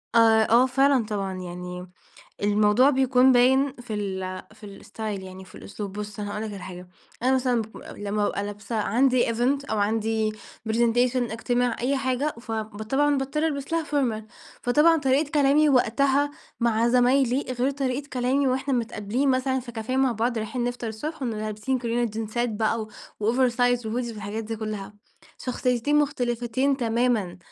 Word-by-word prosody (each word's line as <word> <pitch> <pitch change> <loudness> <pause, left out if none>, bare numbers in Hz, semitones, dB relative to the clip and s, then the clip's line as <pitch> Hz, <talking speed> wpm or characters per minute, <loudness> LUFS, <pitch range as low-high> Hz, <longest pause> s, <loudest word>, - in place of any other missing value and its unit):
آآ، 225 -1 +5
آه 240 +3 +6
فعلًا 270 -1 +3
طبعًا 200 -3 -3
يعني، 180 0 -7 0.6
الموضوع 210 +5 +4
بيكون 260 -1 +4
باين 265 +3 +4
في 240 -3 -6
ال 190 -2 -4
في 220 - -15
الاستايل 205 0 -6
يعني 185 0 -9
وفي 185 - -16
الأسلوب. 200 -1 -7
بُصّ، 210 0 -6
أنا 205 0 -4
هاقول 210 +1 -4
لك 220 - -5
على 195 -2 -8
حاجة، 180 0 -9 0.3
أنا 260 +2 +3
مثلًا 250 -3 +1
باك 220 0 -11
لمّا 205 +1 -2
بابقى 200 0 -1
لابسة 205 +2 -5
عندي 245 +4 +2
event 275 +4 0
أو 220 - 0
عندي 220 +1 0 0.4
presentation، 240 +2 +2 0.2
اجتماع، 245 +1 0
أي 265 +4 +1
حاجة، 265 +3 -1
ف 230 -1 -7
ب 220 -1 -4
طبعًا 285 +6 +2
باضطر 290 +4 -1
ألبس 280 -1 -4
لها 330 -1 +1
formal، 260 -8 -1 0.4
فطبعًا 300 +7 +4
طريقة 280 +1 +1
كلامي 295 +1 +4
وقتها 275 +2 +2 0.3
مع 235 0 +2
زمايلي 250 +2 +3
غير 255 +2 0
طريقة 275 0 -3
كلامي 260 +2 +1
وإحنا 265 +1 0
متقابلين 235 +2 -1
مثلًا 260 0 +1
في 240 -1 -10
كافيه 230 +3 -3
مع 265 -2 +3
بعض، 230 +1 -1
رايحين 230 +3 -3
نفطر 245 -1 -3
الصبح، 290 +8 -6
ونبقى 225 -4 -2
لابسين 215 +5 -2
كلنا 240 0 0
جينزات 225 +2 -2
بقى 220 +1 0
و 215 - -9 0.4
وOversize 245 -1 +2
وHoodies 235 - -9 0.3
والحاجات 210 +1 -5
دي 225 +1 -4
كلها. 210 -2 -5 0.4
شخصيتين 250 +2 0
مختلفتين 255 -2 0
تمامًا، 230 -6 0
240 Hz, 165 wpm, -25 LUFS, 215-265 Hz, 0.6 s, آه